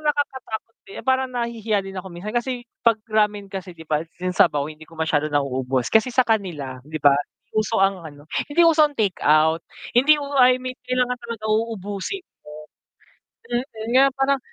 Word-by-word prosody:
parang - - -16
nakakatakot 265 -6 -2
din 195 - -9
parang 260 0 +3
nahihiya 230 -4 -1
din 195 0 -8
ako 190 - -7
minsan 195 +7 -7
kasi, 245 0 -1 0.2
'pag 230 -2 +4
ramen 210 -2 +1
kasi 185 -2 -6
'di 160 -1 -13
ba 150 0 +2 0.2
yung 185 0 -1
sabaw 145 -4 +3
hindi 155 +1 -12
ko 165 - -15
masyado 155 -2 +1
nauubos, 130 -3 0
kasi 220 +3 +4
sa 255 - +6
kanila 165 - -1
'di 155 +1 -5
ba 145 -1 +7 0.4
uso 215 0 +1
ang 195 -2 +2
ano 145 -1 -12 0.3
hindi 340 +4 +4
uso 315 -2 +6
ang 295 - -10
take 200 -4 +1
out. 155 +2 +4 0.3
Hindi 275 +5 +7
u - - -4
I 255 0 +6
mean 255 0 -5
kailangan 250 0 +1
talaga 230 -2 -7
uubusin 215 - -2 0.2
mo. 150 0 -11 0.8
Mm. 240 +1 0 0.3
Na 265 - +7
parang, 270 0 +2
210 Hz, 180 wpm, -23 LUFS, 160-250 Hz, 0.8 s, ba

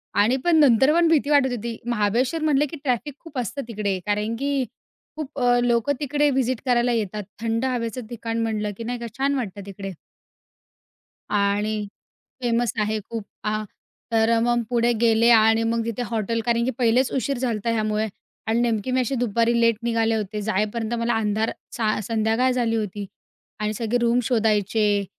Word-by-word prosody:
आणि 220 +6 +3
पण 345 -1 +4
नंतर 270 0 +5
पण 340 0 +4
भीती 310 -3 +2
वाटत 280 -3 +4
होती, 230 0 -5
महाबळेश्वर 240 +6 0
म्हणले, 295 -2 +3
की 310 +3 -8
ट्रॅफिक 270 +2 -1
खूप 325 -5 -11
असतं 250 +4 -3
तिकडे, 205 -4 -2
कारण 210 +2 -1
की 280 -2 0 0.5
खूप 295 -2 -6
अ, 245 -1 +3
लोकं 240 +3 +2
तिकडे 295 +1 +1
व्हिजिट 255 -2 0
करायला 245 -1 +2
येतात, 210 -2 -2 0.2
थंड 230 +2 0
हवेचं 245 -1 -2
ठिकाण 230 -1 -3
म्हटलं 215 -2 -1
की 230 - -6
नाही 245 +1 -3
का 235 - -5
छान 275 +1 +1
वाटतं 205 -6 -4
तिकडे. 195 0 -7 1.4
आणि 205 +1 0 0.6
फेमस 240 -1 +1
आहे 215 +1 0
खूप 230 -2 -4 0.2
अ, 215 0 -1 0.5
तर 225 0 +3
अ, 230 0 +3
मग 240 +1 +1
पुढे 240 -1 +2
गेले 230 0 +4
आणि 225 0 +5
मग 230 0 0
तिथे 230 +1 -3
हॉटेल 230 +1 -1
कारण 235 -1 +2
की 260 - 0
पहिलेच 245 +1 +2
उशीर 270 +1 -1
झालता 235 -3 -1
ह्या - - +2
ह्यामुळे 215 0 0 0.4
आणि 225 +1 +2
नेमकी 230 0 0
मी 255 - +2
अशी 255 +2 -1
दुपारी 235 0 +1
लेट 230 -1 +4
निघाले 225 -1 +1
होते. 210 0 -3
जाईपर्यंत 215 +2 -1
मला 235 +1 +1
अंधार 220 0 0 0.3
सा 215 -2 +1
संध्याकाळ 225 +4 +1
झाली 240 -2 0
होती 205 -2 -3 0.5
आणि 210 0 -1
सगळे 230 +2 -1
रूम 235 +1 +3
शोधायचे. 210 -3 +1
230 Hz, 175 wpm, -23 LUFS, 215-250 Hz, 1.4 s, नंतर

